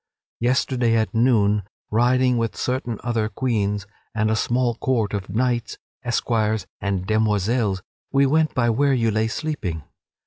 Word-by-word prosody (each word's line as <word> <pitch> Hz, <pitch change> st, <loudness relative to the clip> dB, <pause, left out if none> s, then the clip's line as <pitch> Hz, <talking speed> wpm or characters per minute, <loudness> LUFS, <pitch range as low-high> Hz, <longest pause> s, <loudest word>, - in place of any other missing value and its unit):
Yesterday, 120 Hz, -1 st, +1 dB
at 110 Hz, -1 st, 0 dB
noon, 110 Hz, -3 st, +3 dB, 0.3 s
riding 125 Hz, +3 st, +3 dB
with 115 Hz, -1 st, -1 dB
certain 125 Hz, -3 st, -2 dB
other 115 Hz, -3 st, 0 dB
queens 105 Hz, -3 st, -1 dB, 0.3 s
and 110 Hz, 0 st, +1 dB
a -, -, +2 dB
small 120 Hz, +2 st, +1 dB
court 115 Hz, -3 st, -1 dB
of 100 Hz, -2 st, -3 dB
knights, 120 Hz, +3 st, -1 dB, 0.3 s
esquires, 110 Hz, -4 st, 0 dB
and 100 Hz, -2 st, -2 dB
demoiselles, 105 Hz, -1 st, +1 dB, 0.3 s
we 140 Hz, 0 st, +4 dB
went 155 Hz, +3 st, +2 dB
by 120 Hz, -2 st, +2 dB
where 140 Hz, +4 st, +2 dB
you 115 Hz, -2 st, +1 dB
lay 110 Hz, +1 st, +1 dB
sleeping. 110 Hz, -, -3 dB
115 Hz, 140 wpm, -23 LUFS, 105-125 Hz, 0.3 s, we